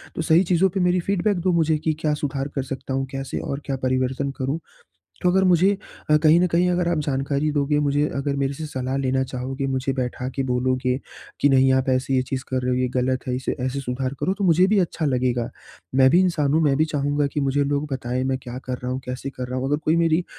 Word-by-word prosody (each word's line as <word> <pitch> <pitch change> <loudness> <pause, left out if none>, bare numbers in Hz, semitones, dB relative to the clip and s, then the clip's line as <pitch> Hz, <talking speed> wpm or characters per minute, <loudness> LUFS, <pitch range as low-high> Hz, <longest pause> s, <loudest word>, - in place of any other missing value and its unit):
तो - - -2
सही 160 +3 +4
चीज़ों 185 +1 +3
पे 190 - -3
मेरी 180 0 +2
फीडबैक 200 +2 0
दो 185 +1 +2
मुझे 160 -2 +2
कि 155 +1 -1
क्या 155 -1 +1
सुधार 140 -2 -2
कर 135 - -1
सकता 135 0 -5
हूँ, 135 0 0
कैसे 135 -1 -4
और 140 - -4
क्या 135 - -2
परिवर्तन 130 +2 0
करूँ। 135 +4 -2 0.6
तो 180 - +3
अगर 190 +1 +3
मुझे 185 +1 +4 0.4
अ, 150 - +7
कहीं 155 +2 +5
न 180 - +3
कहीं, 175 +1 +2
अगर 175 -1 0
आप 170 - +1
जानकारी 140 +2 0
दोगे 145 0 +1
मुझे, 145 0 +1
अगर 140 0 -1
मेरे 140 0 -1
से 155 +3 -6
सलाह 130 -2 -3
लेना 130 -1 +1
चाहोगे, 130 +1 -4
मुझे 135 0 -1
बैठा 125 -1 -3
के 135 - 0
बोलोगे, 130 0 0 0.4
कि 145 - +5
नहीं 135 -1 +5
आप 130 0 +1
ऐसे 130 +1 0
ये 130 - +3
चीज़ 130 -1 -2
कर 130 -1 -1
रहे 125 0 -1
हो 125 - +1
ये 125 0 +1
ग़लत 130 +1 0
है 125 - 0
इसे 130 - -2
ऐसे 130 +2 -2
सुधार 130 0 -3
करो 185 - +1
तो 200 +1 -4
मुझे 180 0 +5
भी 210 +1 +2
अच्छा 170 -3 -1
लगेगा। 125 -3 0 0.5
मैं 130 0 +6
भी 170 - +5
इंसान 165 -6 +2
हूँ, 160 - +3
मैं 145 -3 +3
भी 155 - +3
चाहूँगा 145 -1 0
कि 140 - -3
मुझे 140 0 +1
लोग 145 +1 -1
बताएँ 125 0 -2
मैं 130 0 0
क्या 125 0 -6
कर 125 -1 -3
रहा 125 +1 -4
हूँ, 130 - -2
कैसे 125 +2 -4
कर 130 -2 -6
रहा 125 +1 -4
हूँ। 130 - -2
अगर 145 +1 +1
कोई 160 - +3
मेरी 165 +1 +2
140 Hz, 250 wpm, -23 LUFS, 130-160 Hz, 0.6 s, अ